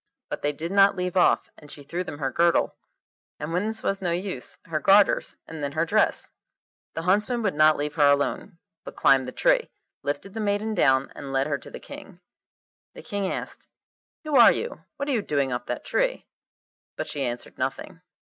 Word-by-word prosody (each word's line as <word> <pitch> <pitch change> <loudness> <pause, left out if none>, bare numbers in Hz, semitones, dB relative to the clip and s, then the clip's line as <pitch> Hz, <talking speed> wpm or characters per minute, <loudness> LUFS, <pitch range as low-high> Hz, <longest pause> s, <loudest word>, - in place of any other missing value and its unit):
But - - -4
they 145 - +1
did 160 +4 -6
not 195 0 +5
leave 180 -1 -3
off, 180 - +3
and 150 - -15
she 145 - -10
threw 170 +6 -3
them 145 -5 -7
her 135 -3 -2
girdle, 170 +4 +2 0.6
and 150 +3 -4
when 185 +5 0
this 220 0 -3
was 195 0 -1
no 180 - -1
use, 175 -5 -2
her 160 -2 -2
garters, 195 +6 +4
and 160 -2 -8
then 140 0 -3
her 160 +2 +1
dress. - - +1 0.6
The 165 - -3
huntsmen 210 +6 +1
would 200 - +1
not 155 +1 +5
leave 150 0 -3
her 145 -2 +4
alone, 145 +6 0 0.3
but - - -9
climbed 135 -1 +4
the - - -5
tree, - - +2 0.3
lifted 170 +7 -4
the 225 - -5
maiden 210 +1 -1
down, 135 -8 +2
and 140 -1 -7
led 135 0 +1
her 145 -1 -2
to - - -12
the - - -9
King. 285 -11 -11 0.8
The - - -10
King 200 -4 -2
asked, - - -6 0.6
'Who 305 -2 -2
are 235 -3 +9
you? 475 +2 -5
What 280 - -3
are - - 0
you 235 -5 +1
doing 140 -7 -1
up 125 - -4
that - - -4
tree?' - - 0 0.7
But - - -3
she 145 - -3
answered 120 -1 -5
nothing. - - -4
170 Hz, 205 wpm, -25 LUFS, 145-205 Hz, 0.8 s, are